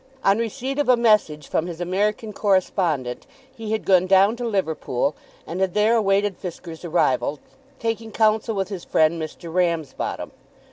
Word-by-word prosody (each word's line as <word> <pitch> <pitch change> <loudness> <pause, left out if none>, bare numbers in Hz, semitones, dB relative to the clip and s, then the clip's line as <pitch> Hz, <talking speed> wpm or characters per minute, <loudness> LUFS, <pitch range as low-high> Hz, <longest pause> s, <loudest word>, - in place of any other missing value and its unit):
On 195 +2 +3
receipt 260 +4 -3
of 290 - +1
a 250 - +6
message 210 -11 +2
from 165 - -1
his 170 -2 -7
American 205 +4 -1
correspondent 175 - 0 0.3
he 220 -2 -6
had 220 - -1
gone 185 -1 +4
down 195 +3 +5
to 240 -1 -3
Liverpool, 160 - -1 0.3
and 180 +3 -4
had 190 -2 0
there 215 +2 +4
awaited 200 -3 +1
Fisker's 170 -2 -8
arrival, 150 -4 +1 0.4
taking 225 -1 -3
counsel 220 +1 +2
with 195 -1 -2
his 190 -4 -6
friend 160 +1 +2
Mr. 160 +1 -7
Ramsbottom. 170 -5 -1
195 Hz, 155 wpm, -23 LUFS, 170-220 Hz, 0.4 s, a